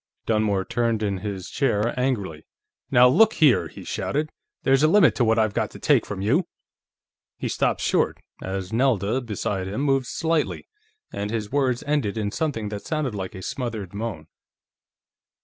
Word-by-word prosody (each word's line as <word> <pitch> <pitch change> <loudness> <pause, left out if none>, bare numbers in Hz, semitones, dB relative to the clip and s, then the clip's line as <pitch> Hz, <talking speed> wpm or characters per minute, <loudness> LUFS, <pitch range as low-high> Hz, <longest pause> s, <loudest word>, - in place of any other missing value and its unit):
Dunmore 105 -3 +1
turned 115 -2 0
in 100 -2 -1
his 95 -2 -5
chair 120 -5 0
angrily. 100 - -2 0.5
"Now, 125 +1 +7
look 205 +12 +5
here!" 150 -6 +4
he - - -11
shouted. 150 +2 -2 0.3
"There's 135 0 +4
a 155 - +5
limit 170 -1 +5
to 125 - +1
what 110 0 +3
I've 110 -2 +2
got - - -1
to - - -12
take - - +3
from 100 -2 -4
you...." 155 - +2 0.9
He - - -3
stopped - - 0
short, - - +1 0.2
as 95 +1 -4
Nelda, 115 -1 +1
beside 105 -4 -3
him, 105 +7 -3
moved 135 -3 +1
slightly, 165 -1 -1 0.5
and 100 +1 -3
his 110 -2 -3
words 130 -3 +1
ended 145 -8 0
in 105 -2 -1
something 115 -9 -2
that 105 -1 -5
sounded 155 -6 -2
like 95 -2 -5
a 95 - -8
smothered 110 -7 -4
moan. 100 -7 -5
115 Hz, 165 wpm, -24 LUFS, 100-135 Hz, 0.9 s, Now